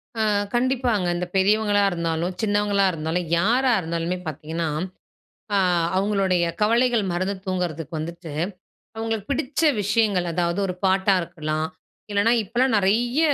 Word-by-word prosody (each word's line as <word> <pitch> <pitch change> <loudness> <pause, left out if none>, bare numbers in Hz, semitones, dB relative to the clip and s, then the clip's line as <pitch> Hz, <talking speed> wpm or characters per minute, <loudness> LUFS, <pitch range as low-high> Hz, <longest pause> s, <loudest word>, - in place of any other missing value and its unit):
ஆ, 225 - -1 0.3
கண்டிப்பாங்க. 245 -5 +1
இந்த 180 - -2
பெரியவங்களா 205 +1 +3
இருந்தாலும், 170 +1 -2
சின்னவங்களா 205 -2 +2
இருந்தாலும் 165 +1 -2
யாரா 245 +8 +3
இருந்தாலுமே 170 +1 -2
பார்த்தீங்கன்னா, 155 +2 -3 0.9
அ - - +4 0.4
அவுங்களுடைய 190 -2 +1 0.2
கவலைகள் 235 +1 +3
மறந்து 185 +3 -1
தூங்குறதுக்கு 170 -4 -3
வந்துட்டு, 170 +1 -6 0.7
அவுங்களுக்கு 225 -2 -3
பிடிச்ச 280 +1 -1 0.2
விஷயங்கள் 205 -3 +1
அதாவது 170 +2 0
ஒரு 180 - -2
பாட்டா 190 +1 +3
இருக்கலாம், 155 -1 -3 0.4
இல்லன்னா 205 +3 +3
இப்பலாம் 240 +4 +1
நிறைய, 230 +7 +2
195 Hz, 115 wpm, -23 LUFS, 170-220 Hz, 0.9 s, அ